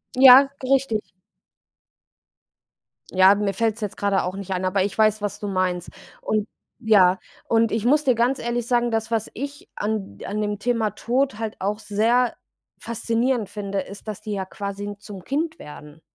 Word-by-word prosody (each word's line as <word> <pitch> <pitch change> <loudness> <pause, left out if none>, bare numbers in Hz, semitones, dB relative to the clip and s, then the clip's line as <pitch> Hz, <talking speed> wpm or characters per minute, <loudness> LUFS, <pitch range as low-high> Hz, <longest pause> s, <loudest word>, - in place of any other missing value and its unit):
Ja, 265 +1 +9
richtig. 260 -4 +1 2.1
Ja, 190 +2 +6
mir 205 -1 -1
fällt's 225 +2 -1
jetzt 210 -2 -4
gerade 200 -1 +1
auch 180 +1 -3
nicht 195 -1 -7
ein, 185 0 -1
aber 185 +1 +1
ich 200 - -4
weiß, 215 -1 +3
was 205 0 -3
du 210 - -4
meinst. 185 -2 -1 0.3
Und 215 0 -1 0.3
ja, 195 -6 +4 0.3
und 230 0 +2
ich 225 0 -1
muss 295 +4 +4
dir 255 -4 +3
ganz 245 +4 +1
ehrlich 240 0 -2
sagen, 240 -1 +1
dass 225 0 -2
was 225 -1 -1
ich 285 +3 -7
an 205 - -3
d - - -9
an 210 +1 -3
dem 205 -1 -2
Thema 230 -2 0
Tod 245 +3 -1
halt 220 -1 -4
auch 205 +2 -2
sehr 230 +4 +1 0.4
faszinierend 230 0 -1
finde, 200 -2 -4
ist, 200 +3 -11
dass 215 -2 -5
die 210 - -5
ja 195 -2 -3
quasi 200 +1 -6
zum 205 -3 -10
Kind 315 +4 -2
werden. 150 +1 -12
215 Hz, 175 wpm, -23 LUFS, 200-240 Hz, 2.1 s, Ja